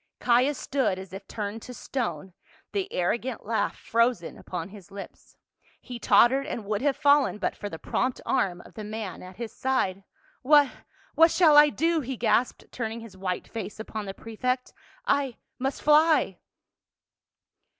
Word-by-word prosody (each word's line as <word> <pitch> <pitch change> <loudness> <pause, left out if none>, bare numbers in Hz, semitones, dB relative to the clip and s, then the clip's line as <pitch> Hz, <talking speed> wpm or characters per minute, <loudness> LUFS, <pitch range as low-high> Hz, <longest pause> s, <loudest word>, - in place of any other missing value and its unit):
Caius 255 +4 +3
stood 265 -9 0
as 190 0 -9
if 195 +1 -8
turned 210 +1 -5
to 250 - -9
stone, 190 - -4 0.4
the 390 -1 -2
arrogant 230 +7 -1
laugh 225 +1 -1
frozen 230 -6 0
upon 175 -1 -6
his 200 -3 -13
lips. 200 0 -11 0.4
He 245 -2 -8
tottered 270 +5 +4
and 230 -8 -4
would 210 +1 -1
have 280 -1 +2
fallen 285 -5 +4
but 210 - -2
for 205 - -6
the 160 - -7
prompt 255 +9 -1
arm 175 -2 0
of - - -16
the 215 - -7
man 215 -2 -5
at 185 0 -11
his 235 +1 -7
side. 200 -8 0 0.4
"What 290 0 +5 0.2
— - - -32
what 330 +1 +6
shall 320 -3 +5
I 295 0 +9
do?" 330 +2 +1
he 260 -1 -5
gasped, 230 +2 +1
turning 230 -1 -4
his 225 -4 -11
white 185 -1 -3
face 220 -2 -6
upon 220 -1 -5
the 195 - -6
prefect. 250 +3 -3 0.2
" - - -28
I 280 - +1
— - - -54
must 265 +2 -2
fly 300 - +4
230 Hz, 170 wpm, -27 LUFS, 200-270 Hz, 0.4 s, I